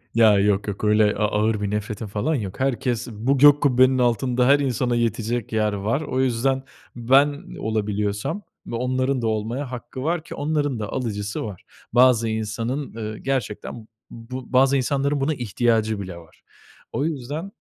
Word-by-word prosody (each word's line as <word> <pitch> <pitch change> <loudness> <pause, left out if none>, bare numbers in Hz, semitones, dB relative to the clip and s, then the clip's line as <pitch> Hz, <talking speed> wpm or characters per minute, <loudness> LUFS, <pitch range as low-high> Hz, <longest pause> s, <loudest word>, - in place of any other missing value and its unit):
Ya, 110 -3 +6
yok, 105 0 +1
yok 100 0 -5
öyle 105 0 +3
a 105 - +1
ağır 105 0 0
bir 100 -1 -2
nefretim 105 +1 -3
falan 105 +11 -1
yok. 100 -8 -5
Herkes 125 -2 -1
bu 120 +6 0
gök 145 +1 +7
kubbenin 130 -1 +4
altında 125 +1 +2
her 140 +1 +6
insana 125 -3 0
yetecek 115 0 -1
yer 105 -1 +1
var. 105 +8 -1
O 130 -4 -1
yüzden 130 +1 +1 0.3
ben 135 +5 +2
olabiliyorsam 105 - -2 0.3
ve - - -4
onların 130 +2 0
da 115 - 0
olmaya 115 +5 -2
hakkı 125 +1 -7
var 165 +1 -1
ki - - -9
onların 145 -4 -1
da 105 -1 -4
alıcısı 105 -5 -3
var. 100 -4 -8 0.3
Bazı 120 -2 +5
insanın, 115 +5 -3 0.2
eee, - - -9
gerçekten 120 -4 -3
b - - -22 0.2
bu 125 +3 -8
bazı 135 +2 +5
insanların 140 +2 0
buna 150 +3 +1
ihtiyacı 115 -3 0
bile 90 -3 -7
var. 85 -1 -17 0.5
O 140 - -1
yüzden 155 +4 -4
120 Hz, 165 wpm, -23 LUFS, 105-135 Hz, 0.5 s, gök